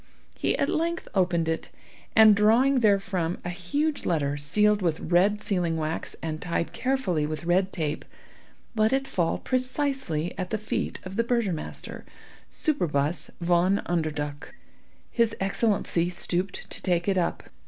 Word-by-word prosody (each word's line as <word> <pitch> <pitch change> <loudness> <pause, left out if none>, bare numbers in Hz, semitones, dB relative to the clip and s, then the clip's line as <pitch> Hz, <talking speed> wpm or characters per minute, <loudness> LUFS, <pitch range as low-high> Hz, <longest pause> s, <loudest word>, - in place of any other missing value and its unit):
He - - 0
at - - +1
length 335 +1 -1
opened 175 -4 +2
it, 160 0 -2 0.5
and 220 -2 +8
drawing 235 +6 +4
there 205 -4 +4
from 180 -3 -2
a 175 - -2
huge 285 - -1
letter 145 -4 0
sealed 210 +9 +2
with 165 -4 0
red 190 +5 +2
sealing 175 -4 0
wax 155 +1 -3
and 155 -1 -3
tied 170 -1 -2
carefully 210 - 0
with 155 +2 -4
red 185 +3 +2
tape, 155 -3 -2 0.7
let 220 +2 +3
it 270 0 +1
fall 170 -3 0
precisely 255 - -1
at 185 -1 -3
the 220 - -1
feet 215 - -3
of 185 +2 -7
the 230 - +3
burgomaster, 230 -9 -2 0.5
Superbus 170 - -1
Von 175 +3 +2
Underduk. 150 - -3 0.6
His 230 -2 +2
Excellency 195 -3 +1
stooped 180 +1 -2
to - - -3
take 175 -1 0
it 195 -2 +2
up. 170 - -2
185 Hz, 145 wpm, -26 LUFS, 165-220 Hz, 0.7 s, and